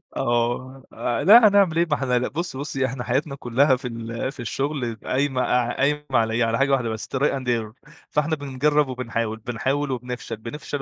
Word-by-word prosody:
آه، 120 Hz, +3 st, -1 dB
آآ 120 Hz, +2 st, -2 dB
لا 215 Hz, +6 st, +9 dB
هنعمل 200 Hz, -5 st, +3 dB
إيه؟ 170 Hz, -, +4 dB
ما 150 Hz, -, 0 dB
إحنا 125 Hz, -3 st, +1 dB
لا 125 Hz, -, -1 dB
بُصّي، 165 Hz, -3 st, -4 dB
بُصّي، 135 Hz, -2 st, -2 dB
إحنا 130 Hz, -1 st, -4 dB
حياتنا 140 Hz, +4 st, -1 dB
كُلّها 130 Hz, +2 st, +2 dB
في 125 Hz, 0 st, -6 dB
ال 115 Hz, +2 st, -4 dB
في 140 Hz, -, -18 dB
الشُغل 130 Hz, 0 st, -2 dB
قايمة 130 Hz, 0 st, 0 dB
ع 125 Hz, -1 st, +1 dB
قايمة 150 Hz, +2 st, +1 dB
على 110 Hz, -1 st, +2 dB
إيه؟ 115 Hz, +1 st, +2 dB
على 115 Hz, 0 st, 0 dB
حاجة 135 Hz, +2 st, +2 dB
واحدة 125 Hz, -4 st, +1 dB
بس، 110 Hz, 0 st, -5 dB
try -, -, -2 dB
and 135 Hz, -2 st, 0 dB
error. 115 Hz, +3 st, -3 dB, 0.2 s
فإحنا 155 Hz, +2 st, 0 dB
بنجرّب 145 Hz, +1 st, +1 dB
وبنحاول، 115 Hz, -3 st, -3 dB
بنحاول 135 Hz, +5 st, -2 dB
وبنفشل، 125 Hz, -2 st, -5 dB
بنفشل 145 Hz, +5 st, -6 dB
130 Hz, 195 wpm, -23 LUFS, 120-145 Hz, 0.2 s, لا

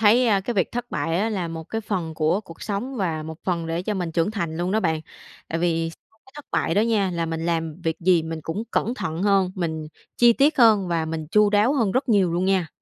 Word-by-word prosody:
thấy, 225 Hz, +4 st, +5 dB
ơ, 200 Hz, -3 st, +3 dB
cái 235 Hz, +5 st, -3 dB
việc 185 Hz, -, 0 dB
thất 245 Hz, 0 st, -4 dB
bại 165 Hz, 0 st, -1 dB
á, 215 Hz, -, +1 dB
là 185 Hz, -6 st, -2 dB
một 165 Hz, 0 st, -6 dB
cái 225 Hz, +7 st, -4 dB
phần 185 Hz, -7 st, -3 dB
của 160 Hz, +5 st, +1 dB
cuộc 170 Hz, -6 st, -13 dB
sống 220 Hz, +6 st, -3 dB
và 165 Hz, -7 st, -1 dB
một 160 Hz, 0 st, -8 dB
phần 170 Hz, -3 st, -1 dB
để 165 Hz, +1 st, -2 dB
cho 210 Hz, +3 st, -2 dB
mình 175 Hz, -4 st, -3 dB
trưởng 165 Hz, +4 st, +1 dB
thành 170 Hz, -7 st, -3 dB
luôn 175 Hz, +2 st, -1 dB
đó 220 Hz, -, +2 dB
bạn. 160 Hz, -4 st, 0 dB, 0.5 s
Tại 165 Hz, -, -2 dB
vì 165 Hz, -1 st, 0 dB
sau 225 Hz, +6 st, -21 dB
cái 265 Hz, -, -19 dB
thất 295 Hz, -, -9 dB
bại 165 Hz, -, 0 dB
đó 205 Hz, -, +4 dB
nha, 215 Hz, -4 st, +1 dB
là 170 Hz, -1 st, -2 dB
mình 165 Hz, 0 st, -3 dB
làm 165 Hz, 0 st, -2 dB
việc 160 Hz, 0 st, 0 dB
gì 175 Hz, -1 st, +4 dB
mình 160 Hz, 0 st, -5 dB
cũng 195 Hz, +7 st, -3 dB
cẩn 235 Hz, -, 0 dB
thận 165 Hz, -7 st, -3 dB
hơn, 195 Hz, -2 st, +3 dB
mình 160 Hz, -4 st, -3 dB, 0.3 s
chi 240 Hz, -1 st, +6 dB
tiết 280 Hz, +5 st, +2 dB
hơn 215 Hz, -6 st, +5 dB
và 165 Hz, -2 st, 0 dB
mình 160 Hz, -1 st, -4 dB
chu 210 Hz, -1 st, +4 dB
đáo 210 Hz, +5 st, +3 dB
hơn 225 Hz, -8 st, +1 dB
rất 260 Hz, +2 st, 0 dB
nhiều 195 Hz, -6 st, +3 dB
luôn 175 Hz, +2 st, 0 dB
nha. 190 Hz, -4 st, +1 dB
180 Hz, 260 wpm, -23 LUFS, 165-215 Hz, 0.5 s, chi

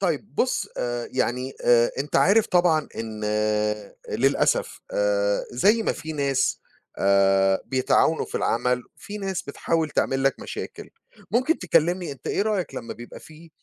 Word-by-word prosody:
طيّب 180 Hz, 0 st, -2 dB
بُص، 255 Hz, -, 0 dB
آآ، 120 Hz, -1 st, -2 dB
يعني، 125 Hz, +2 st, -1 dB
آآ، 120 Hz, -1 st, +5 dB
أنت 140 Hz, +1 st, -1 dB
عارف 210 Hz, +3 st, +4 dB
طبعًا 175 Hz, -4 st, +2 dB
إن 110 Hz, -1 st, -5 dB, 0.9 s
للأسف 140 Hz, -, +1 dB
آآ، -, -, +1 dB
زي 220 Hz, +3 st, +3 dB
ما -, -, +1 dB
فيه 155 Hz, 0 st, -7 dB
ناس، 140 Hz, -2 st, 0 dB, 0.4 s
آآ، 95 Hz, -1 st, +3 dB
بيتعاونوا 130 Hz, +4 st, +2 dB
في -, -, -13 dB
العمل، 125 Hz, +2 st, 0 dB
فيه 210 Hz, +1 st, -8 dB
ناس 195 Hz, -3 st, -3 dB
بتحاول 160 Hz, +2 st, -1 dB
تعمل 135 Hz, -1 st, 0 dB
لك 135 Hz, -, +1 dB
مشاكل. -, -, -7 dB, 0.4 s
ممكن 255 Hz, +8 st, +2 dB
تكلمني 175 Hz, 0 st, +1 dB
أنت 135 Hz, -, -14 dB
إيه -, -, +1 dB
رأيك 210 Hz, -4 st, -1 dB
لمّا -, -, -6 dB
بيبقى 120 Hz, 0 st, -11 dB
فيه 160 Hz, +1 st, -15 dB
155 Hz, 145 wpm, -24 LUFS, 125-200 Hz, 0.9 s, آآ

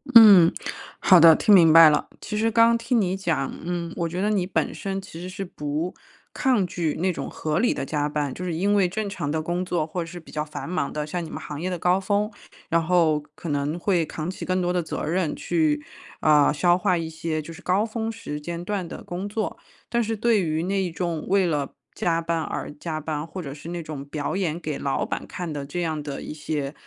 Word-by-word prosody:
嗯， 200 Hz, -7 st, +10 dB, 0.5 s
好 185 Hz, -2 st, +7 dB
的， 165 Hz, -1 st, +9 dB
听 210 Hz, -, +4 dB
明 165 Hz, -4 st, +8 dB
白 165 Hz, 0 st, +10 dB
了。 150 Hz, -, +1 dB
其 210 Hz, -, -5 dB
实 225 Hz, +2 st, +2 dB
刚 230 Hz, 0 st, +5 dB
听 235 Hz, +1 st, +1 dB
你 190 Hz, -1 st, +1 dB
讲 165 Hz, -8 st, -1 dB
嗯， 170 Hz, -1 st, -3 dB
我 170 Hz, -1 st, -1 dB
觉 180 Hz, -, -4 dB
得 210 Hz, -, +1 dB
你 190 Hz, -4 st, +1 dB
本 -, -, -1 dB
身 195 Hz, -1 st, -4 dB
其 170 Hz, -3 st, -10 dB
实 180 Hz, -, -6 dB
是 195 Hz, +1 st, -5 dB
不 150 Hz, +1 st, -3 dB, 0.4 s
抗 245 Hz, -8 st, +2 dB
拒， 165 Hz, -3 st, -2 dB
那 185 Hz, 0 st, +1 dB
种 -, -, -5 dB
合 155 Hz, -1 st, -2 dB
理 240 Hz, -, +3 dB
的 -, -, -4 dB
加 150 Hz, +1 st, -1 dB
班 145 Hz, -3 st, -2 dB
就 180 Hz, -, -7 dB
是 180 Hz, -, -2 dB
因 200 Hz, +4 st, +1 dB
为 190 Hz, -3 st, +3 dB
正 215 Hz, +2 st, -3 dB
常 150 Hz, -7 st, -4 dB
的 155 Hz, +1 st, 0 dB
工 175 Hz, +2 st, -1 dB
作， 170 Hz, -4 st, -1 dB
或 175 Hz, +2 st, -4 dB
者 165 Hz, -, -5 dB
是 175 Hz, +1 st, -8 dB
比 160 Hz, -, -15 dB
较 150 Hz, 0 st, -2 dB
繁 155 Hz, +1 st, -7 dB
忙 180 Hz, -5 st, -1 dB
的， 150 Hz, -1 st, -3 dB
像 175 Hz, +3 st, -3 dB
你 160 Hz, -, -7 dB
们 -, -, -6 dB
行 150 Hz, +1 st, -7 dB
业 185 Hz, -, -1 dB
的 180 Hz, -, -2 dB
高 180 Hz, +3 st, +2 dB
峰， 205 Hz, +2 st, 0 dB, 0.4 s
然 165 Hz, -1 st, +2 dB
后 165 Hz, -3 st, +3 dB, 0.2 s
可 170 Hz, -, -7 dB
能 145 Hz, +3 st, -1 dB
会 175 Hz, -2 st, +1 dB
扛 160 Hz, +2 st, -4 dB
起 190 Hz, -, -6 dB
更 185 Hz, 0 st, 0 dB
多 180 Hz, 0 st, 0 dB
的 180 Hz, -, +1 dB
责 160 Hz, -, -4 dB
任， 165 Hz, -1 st, 0 dB
去， 155 Hz, -4 st, +1 dB, 0.4 s
呃， 150 Hz, -2 st, +5 dB
消 175 Hz, +4 st, +3 dB
化 185 Hz, -1 st, +1 dB
一 165 Hz, -1 st, -3 dB
些， 160 Hz, 0 st, -3 dB
就 160 Hz, +2 st, -7 dB
是 -, -, -12 dB
高 195 Hz, +4 st, +2 dB
峰 225 Hz, 0 st, -3 dB
时 150 Hz, -10 st, -6 dB
间 170 Hz, +2 st, -5 dB
段 200 Hz, -3 st, -2 dB
的 -, -, -8 dB
工 185 Hz, +3 st, -5 dB
作。 215 Hz, +1 st, -3 dB, 0.3 s
但 235 Hz, 0 st, +1 dB
是 225 Hz, 0 st, -2 dB
对 225 Hz, -2 st, +3 dB
于 160 Hz, -1 st, -1 dB
那 190 Hz, -2 st, -1 dB
种 170 Hz, -2 st, -3 dB
为 195 Hz, -1 st, +3 dB
了 150 Hz, -4 st, -1 dB, 0.2 s
加 165 Hz, -1 st, 0 dB
班 165 Hz, -1 st, -1 dB
而 150 Hz, -, -4 dB
加 155 Hz, +1 st, -4 dB
班， 155 Hz, 0 st, -3 dB
或 185 Hz, -, -7 dB
者 140 Hz, -, -6 dB
是 150 Hz, +3 st, -9 dB
那 175 Hz, -1 st, -4 dB
种 150 Hz, -3 st, -6 dB
表 145 Hz, +4 st, -3 dB
演 170 Hz, -4 st, -1 dB
给 155 Hz, -4 st, -4 dB
老 135 Hz, -1 st, -1 dB
板 -, -, -4 dB
看 175 Hz, -3 st, -5 dB
的 145 Hz, -1 st, -4 dB
这 175 Hz, +5 st, -4 dB
样 160 Hz, -3 st, -2 dB
的 145 Hz, -2 st, -6 dB
一 -, -, -6 dB
些， 150 Hz, -2 st, -3 dB
170 Hz, 260 characters per minute, -24 LUFS, 155-190 Hz, 0.5 s, 嗯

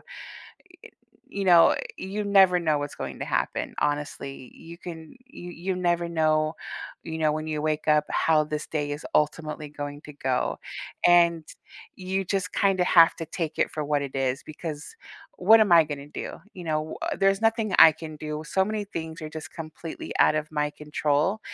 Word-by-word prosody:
eh, -, -, -27 dB, 1.2 s
you 200 Hz, -, -5 dB
know, 175 Hz, -3 st, +7 dB
uh, -, -, 0 dB, 0.2 s
you 200 Hz, +2 st, -4 dB
never 190 Hz, -3 st, +5 dB
know 155 Hz, -3 st, +1 dB
what's 145 Hz, 0 st, -5 dB
going -, -, -6 dB
to -, -, -3 dB
happen, -, -, -2 dB
honestly. 140 Hz, -3 st, -3 dB
You 170 Hz, +1 st, -12 dB
can 165 Hz, +2 st, -9 dB
you 175 Hz, -6 st, -10 dB
you 180 Hz, +2 st, -3 dB
never 175 Hz, -1 st, 0 dB
know, 155 Hz, -1 st, +1 dB, 0.5 s
you 160 Hz, 0 st, -5 dB
know, 155 Hz, -1 st, +2 dB
when 155 Hz, +1 st, -4 dB
you 155 Hz, -1 st, -2 dB
wake 155 Hz, 0 st, -2 dB
up 150 Hz, 0 st, +4 dB
how 155 Hz, -1 st, +3 dB
this 150 Hz, 0 st, -5 dB
day 145 Hz, -2 st, -2 dB
is 145 Hz, -, -6 dB
ultimately 150 Hz, 0 st, -1 dB
going 145 Hz, 0 st, -7 dB
to 150 Hz, -, -11 dB
go. 130 Hz, -3 st, -1 dB, 0.5 s
And 170 Hz, -1 st, +5 dB, 0.5 s
you 190 Hz, +1 st, -2 dB
just 195 Hz, +1 st, -2 dB
kinda 190 Hz, -2 st, +2 dB
have 165 Hz, -2 st, +6 dB
to 165 Hz, -, -6 dB
take 160 Hz, 0 st, -4 dB
it -, -, +2 dB
for 155 Hz, -1 st, -3 dB
what 145 Hz, -1 st, 0 dB
it 140 Hz, -2 st, -6 dB
is 135 Hz, 0 st, -1 dB
because 155 Hz, -1 st, -7 dB, 0.4 s
what 220 Hz, +5 st, +6 dB
am 200 Hz, -5 st, +4 dB
I 165 Hz, -1 st, +8 dB
gonna 145 Hz, -2 st, -6 dB
do? 150 Hz, -, -7 dB
You 180 Hz, -, -9 dB
know, 155 Hz, -1 st, -2 dB
uh, -, -, -2 dB
there's 195 Hz, 0 st, +3 dB
nothing 225 Hz, -3 st, +1 dB
I 160 Hz, -, +11 dB
can 160 Hz, 0 st, -9 dB
do, 150 Hz, 0 st, -5 dB
so 190 Hz, +4 st, +1 dB
many 215 Hz, 0 st, -3 dB
things 160 Hz, -4 st, -6 dB
are 155 Hz, -, -5 dB
just 155 Hz, -2 st, -8 dB
completely 160 Hz, 0 st, -7 dB
out 155 Hz, -, +5 dB
of 150 Hz, 0 st, -3 dB
my 150 Hz, -1 st, 0 dB
control, 150 Hz, +6 st, -1 dB
160 Hz, 190 wpm, -26 LUFS, 150-180 Hz, 1.2 s, I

